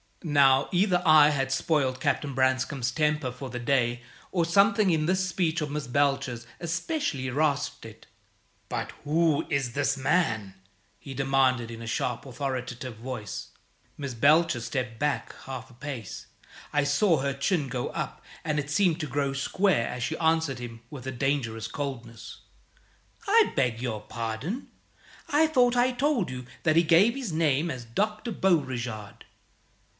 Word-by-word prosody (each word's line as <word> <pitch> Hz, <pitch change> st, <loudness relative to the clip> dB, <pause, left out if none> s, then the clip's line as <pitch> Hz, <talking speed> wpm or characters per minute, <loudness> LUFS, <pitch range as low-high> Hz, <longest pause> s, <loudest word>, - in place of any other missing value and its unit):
Now, 140 Hz, -4 st, +4 dB
either 180 Hz, 0 st, +3 dB
I 155 Hz, -2 st, +8 dB
had 135 Hz, -2 st, -1 dB
spoiled 135 Hz, -3 st, +1 dB
Captain 140 Hz, +2 st, 0 dB
Branscome's 130 Hz, 0 st, +1 dB
temper 150 Hz, -4 st, 0 dB
for 130 Hz, +2 st, -8 dB
the 125 Hz, 0 st, -5 dB
day, 120 Hz, -1 st, +1 dB, 0.3 s
or 175 Hz, -3 st, +1 dB
something 200 Hz, +4 st, +4 dB
in 155 Hz, -2 st, +1 dB
this 185 Hz, +1 st, +1 dB
speech 170 Hz, -3 st, 0 dB
of 150 Hz, -, -2 dB
Miss 150 Hz, -1 st, -3 dB
Belcher's 135 Hz, -3 st, 0 dB
especially 170 Hz, -, -2 dB
rasped 145 Hz, +1 st, 0 dB
it. -, -, -12 dB, 0.6 s
"But -, -, -3 dB
who 155 Hz, 0 st, +2 dB
is 135 Hz, -4 st, -1 dB
this 145 Hz, 0 st, +1 dB
man?" 115 Hz, -, 0 dB, 0.4 s
he 135 Hz, -2 st, -9 dB
demanded, 130 Hz, -3 st, +2 dB
in 115 Hz, 0 st, -8 dB
a -, -, -7 dB
sharp, 120 Hz, +2 st, -2 dB
authoritative 130 Hz, -2 st, -4 dB
voice. 115 Hz, -3 st, -6 dB, 0.5 s
Miss 140 Hz, -3 st, -4 dB
Belcher 145 Hz, +3 st, +4 dB
stepped 125 Hz, -2 st, -4 dB
back 150 Hz, 0 st, -1 dB
half 130 Hz, -1 st, -7 dB
a -, -, -16 dB
pace. 125 Hz, -4 st, -7 dB, 0.5 s
I 145 Hz, 0 st, +3 dB
saw 155 Hz, +5 st, +3 dB
her 140 Hz, 0 st, -1 dB
chin 140 Hz, +2 st, 0 dB
go 125 Hz, -1 st, -3 dB
up, -, -, -5 dB, 0.2 s
and 150 Hz, -2 st, 0 dB
it 145 Hz, 0 st, -4 dB
seemed 175 Hz, +1 st, +2 dB
to 155 Hz, -, -3 dB
grow 140 Hz, +1 st, -1 dB
square 140 Hz, -, +1 dB
as 125 Hz, -1 st, -4 dB
she -, -, -2 dB
answered 160 Hz, -5 st, +1 dB
him 115 Hz, -2 st, -8 dB
with 135 Hz, -4 st, -8 dB
a -, -, -2 dB
dangerous 120 Hz, -4 st, -1 dB
coldness. 120 Hz, -4 st, -6 dB, 0.9 s
"I 440 Hz, +2 st, +4 dB
beg 125 Hz, -4 st, +1 dB
your 115 Hz, -4 st, -3 dB
pardon. 115 Hz, -, -4 dB, 0.6 s
I 300 Hz, +2 st, +4 dB
thought 250 Hz, -5 st, +3 dB
I 245 Hz, +1 st, +3 dB
told 275 Hz, -, +1 dB
you 125 Hz, 0 st, -6 dB, 0.2 s
that 155 Hz, -2 st, +2 dB
he 165 Hz, -, +6 dB
gave 180 Hz, +9 st, +5 dB
his 260 Hz, -8 st, -4 dB
name 155 Hz, 0 st, +1 dB
as 125 Hz, -4 st, -6 dB
Dr. 210 Hz, -, -2 dB
Beauregard." 125 Hz, -, -1 dB
140 Hz, 155 wpm, -27 LUFS, 125-165 Hz, 0.9 s, I